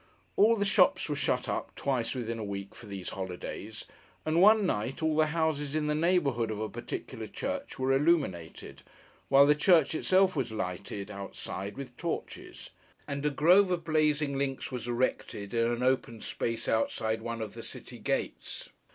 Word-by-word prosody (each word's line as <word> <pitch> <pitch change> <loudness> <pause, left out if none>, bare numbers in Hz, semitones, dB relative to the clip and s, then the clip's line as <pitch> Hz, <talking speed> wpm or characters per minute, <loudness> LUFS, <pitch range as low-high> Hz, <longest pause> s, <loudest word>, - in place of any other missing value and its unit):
All 225 +3 +5
the 200 -2 0
shops 195 - +4
were - - 0
shut - - 0
up, - - -3
twice 130 -3 -1
within 115 -2 -3
a - - -3
week, 100 -1 -5
for 115 - -12
these 100 -2 -5
holidays; 95 -2 -6 0.4
and 160 +2 +2
one 210 +1 +7
night, 125 - -2
all 160 -1 +2
the 155 0 +4
houses 155 -2 -1
in 155 -1 +1
the 150 - +1
neighbourhood 150 -8 +2
of 110 -1 -3
a 110 0 -2
particular - - -6
church - - -4
were 130 +1 +1
illuminated, 135 - 0 0.5
while 135 +1 +7
the 145 - +6
church 160 0 +4
itself 185 +3 +3
was 130 -5 -1
lighted, 100 0 -4
outside, 100 +1 -6
with 125 -3 -8
torches; - - -5 0.4
and 140 0 -3
a - - +3
grove 180 +7 +5
of 175 -2 -1
blazing 150 -3 +1
links 135 -1 -2
was 125 -2 -5
erected, 120 -4 -2
in 115 0 +2
an 120 +1 -1
open 125 -3 +1
space 115 +1 -3
outside 110 0 0
one 115 0 -4
of 110 -2 -5
the - - -8
city - - -9
gates. - - -3
135 Hz, 175 wpm, -30 LUFS, 110-155 Hz, 0.5 s, one